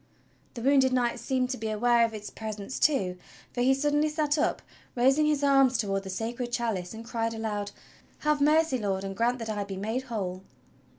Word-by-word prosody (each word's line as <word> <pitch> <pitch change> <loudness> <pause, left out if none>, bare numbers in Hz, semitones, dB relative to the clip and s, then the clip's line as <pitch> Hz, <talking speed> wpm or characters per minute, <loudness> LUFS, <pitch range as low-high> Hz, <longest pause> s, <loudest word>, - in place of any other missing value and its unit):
The 235 - -6
wounded 265 -1 +4
Knight 245 -1 +1
seemed 255 -1 -1
to 255 - -3
be 220 0 -3
aware 235 +2 +3
of 225 -1 0
its 210 -1 -7
presence 215 +2 -6
too, 195 -12 +2 0.4
for 245 - -2
he 265 +2 +4
suddenly 295 +2 +1
sat 300 -1 0
up 305 - 0 0.3
raising 270 +5 +4
his 295 -2 +1
arms 270 -3 +4
toward 195 -2 -1
the 195 - -8
Sacred 235 +5 -3
Chalice 225 -6 -2
and 225 +1 -9
cried 230 -1 -2
aloud: 210 -2 -3 0.5
"Have 300 -1 +1
mercy. 305 -2 +3
Lord, 195 -3 -1
and 195 0 -5
grant 235 +4 +1
that 225 -2 -6
I 205 -1 -2
be 195 -1 -6
made 220 +6 -2
whole!" 185 -5 -3
235 Hz, 195 wpm, -28 LUFS, 210-270 Hz, 0.5 s, wounded